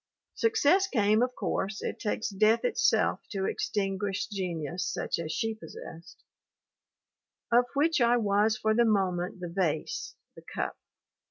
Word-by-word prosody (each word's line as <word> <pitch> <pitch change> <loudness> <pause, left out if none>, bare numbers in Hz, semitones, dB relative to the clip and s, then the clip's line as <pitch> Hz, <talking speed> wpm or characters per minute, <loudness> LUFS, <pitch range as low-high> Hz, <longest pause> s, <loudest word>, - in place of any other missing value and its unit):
Success 390 -4 +3
came, 215 - +2
of 250 0 0
course; 200 +1 -2
it - - -4
takes 220 0 -2
death 215 - +3
itself 485 - +2
to 195 -2 -2
extinguish 195 -1 -1
genius 180 -4 -3
such - - -2
as 160 -2 -4
she 225 +6 -1
possessed, 165 -5 -11 1.3
"of 240 +1 +5
which 310 +1 +2
I 240 +1 +4
was 210 0 +2
for 220 0 +1
the 235 +2 +4
moment 190 -4 0
the 175 - -3
vase, 170 -4 -2 0.2
the - - -12
cup." - - -4
210 Hz, 140 wpm, -29 LUFS, 190-235 Hz, 1.3 s, of